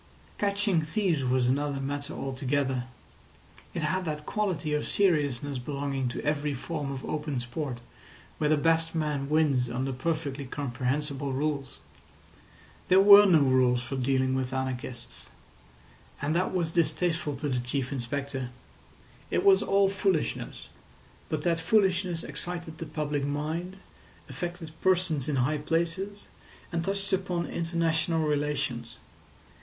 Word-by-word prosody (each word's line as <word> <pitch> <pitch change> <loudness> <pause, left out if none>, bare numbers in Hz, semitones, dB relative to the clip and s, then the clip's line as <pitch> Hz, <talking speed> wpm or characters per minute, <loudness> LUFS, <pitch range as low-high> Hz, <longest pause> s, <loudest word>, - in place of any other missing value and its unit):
Catching 200 -3 +2
thieves 165 -2 0
was 125 -1 +2
another 140 +2 0
matter 145 +2 -4
altogether. 130 -1 -1 0.9
It 165 - -2
had 185 +5 0
that 150 -2 -4
quality 185 -8 -1
of 150 - 0
seriousness 145 -8 +1
belonging 140 0 -2
to 120 - -4
every 150 -1 0
form 145 +1 -4
of 135 -1 -5
open 150 -3 -2
sport 125 0 -4 0.6
where 150 - +2
the 155 - +4
best 165 +2 +2
man 150 -3 -1
wins 145 -6 +3
under 130 +3 -2
perfectly 140 0 -2
comprehensible 135 +1 -2
rules. 140 -1 -2 1.1
There 185 - +6
were 200 +1 +10
no 165 -5 +6
rules 130 -2 +3
for 130 +2 -4
dealing 130 0 +1
with 130 0 -1
anarchists. 125 - -4 0.9
And 145 +3 -1
that 180 +2 +1
was 175 -3 0
distasteful 165 -2 +1
to 145 +2 -3
the 130 -3 0
Chief 125 +2 -2
Inspector. 135 0 -3 0.8
It - - +1
was 390 -1 +7
all 195 0 +3
foolishness, 195 -4 -1 0.6
but 155 -1 -2
that 170 -1 +2
foolishness 185 -1 +2
excited 170 -2 -5
the 165 - -5
public 150 -2 -2
mind, 155 +6 -3 0.5
affected 175 -2 -5
persons 175 -7 +2
in 145 - 0
high 140 +4 +1
places, 170 +6 -2 0.5
and 170 -1 -1
touched 195 +1 -2
upon 180 -2 0
international 165 -1 0
relations. 140 -6 -1
150 Hz, 130 wpm, -28 LUFS, 135-170 Hz, 1.1 s, were